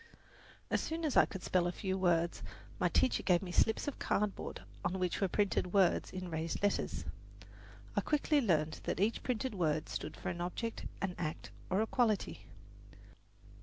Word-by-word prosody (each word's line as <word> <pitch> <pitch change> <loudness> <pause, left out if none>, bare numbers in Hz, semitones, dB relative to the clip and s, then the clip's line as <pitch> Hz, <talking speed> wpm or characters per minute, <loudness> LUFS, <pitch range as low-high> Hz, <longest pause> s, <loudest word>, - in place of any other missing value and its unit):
As - - +2
soon 325 +1 -2
as 295 - 0
I - - +8
could 190 -3 -7
spell 180 -1 +2
a - - 0
few 190 +1 -2
words 175 -2 +2 0.4
my - - +3
teacher 255 - +3
gave 180 -1 +3
me 180 - -5
slips 220 +8 +2
of 290 - -3
cardboard 210 -1 -1 0.2
on 180 +2 0
which 180 0 -1
were 195 - +4
printed 185 -2 0
words 195 -3 +4
in 185 -1 -5
raised 165 +4 -2
letters. 200 - 0 0.9
I 205 - +3
quickly 300 +3 +2
learned 160 - +1
that - - -1
each 210 +4 +2
printed 250 0 -1
word 155 -5 0
stood 155 - -4
for - - -4
an 175 0 -4
object, 225 +6 -3 0.2
an 190 -2 0
act, 155 -2 -4 0.2
or 190 +3 +2
a - - +2
quality. 225 -3 0
190 Hz, 175 wpm, -34 LUFS, 175-215 Hz, 0.9 s, I